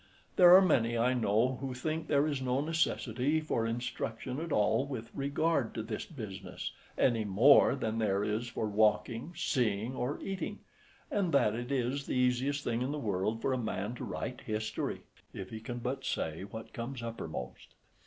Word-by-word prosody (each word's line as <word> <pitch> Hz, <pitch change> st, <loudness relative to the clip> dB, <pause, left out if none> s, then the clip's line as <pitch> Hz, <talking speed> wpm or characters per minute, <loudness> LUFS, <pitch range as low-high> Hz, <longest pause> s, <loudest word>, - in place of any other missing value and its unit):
There 180 Hz, -1 st, +9 dB
are 190 Hz, -, +8 dB
many, 120 Hz, -9 st, +2 dB
I 125 Hz, +2 st, +3 dB
know, 120 Hz, +2 st, +2 dB
who 135 Hz, -2 st, -3 dB
think 155 Hz, +5 st, -3 dB
there 145 Hz, -1 st, +3 dB
is 145 Hz, -3 st, -1 dB
no 130 Hz, 0 st, +1 dB
necessity 150 Hz, -3 st, 0 dB
for 115 Hz, -7 st, -1 dB
instruction 120 Hz, +2 st, -3 dB
at 165 Hz, 0 st, -5 dB
all 110 Hz, +2 st, +3 dB
with 115 Hz, -5 st, -6 dB
regard 140 Hz, -1 st, 0 dB
to 110 Hz, -, -2 dB
this 110 Hz, -1 st, -5 dB
business, 105 Hz, -, -6 dB, 0.3 s
any 115 Hz, -3 st, +3 dB
more 115 Hz, +11 st, +6 dB
than 115 Hz, -4 st, -2 dB
there 100 Hz, -2 st, +1 dB
is 110 Hz, +3 st, -1 dB
for 115 Hz, -2 st, -3 dB
walking, 110 Hz, +6 st, +1 dB
seeing, 120 Hz, -7 st, 0 dB
or 125 Hz, +4 st, -2 dB
eating, 195 Hz, -1 st, -4 dB, 0.5 s
and 195 Hz, -4 st, +1 dB
that 105 Hz, -6 st, +4 dB
it 120 Hz, +3 st, -4 dB
is 135 Hz, +1 st, -1 dB
the -, -, -1 dB
easiest 125 Hz, +3 st, +1 dB
thing 120 Hz, 0 st, -1 dB
in 130 Hz, +2 st, -1 dB
the 150 Hz, -, -2 dB
world 110 Hz, -2 st, -1 dB
for 135 Hz, -, +2 dB
a 130 Hz, -, 0 dB
man 110 Hz, -1 st, -3 dB
to 125 Hz, -, -7 dB
write 125 Hz, -, -4 dB
history 110 Hz, 0 st, -3 dB, 0.3 s
if 95 Hz, -1 st, -7 dB
he 110 Hz, -, -5 dB
can 120 Hz, +2 st, -6 dB
but 130 Hz, +3 st, -3 dB
say 80 Hz, +4 st, -2 dB
what 110 Hz, +2 st, -9 dB
comes 120 Hz, +1 st, -5 dB
uppermost. 80 Hz, -, -6 dB
120 Hz, 180 wpm, -32 LUFS, 110-140 Hz, 0.5 s, There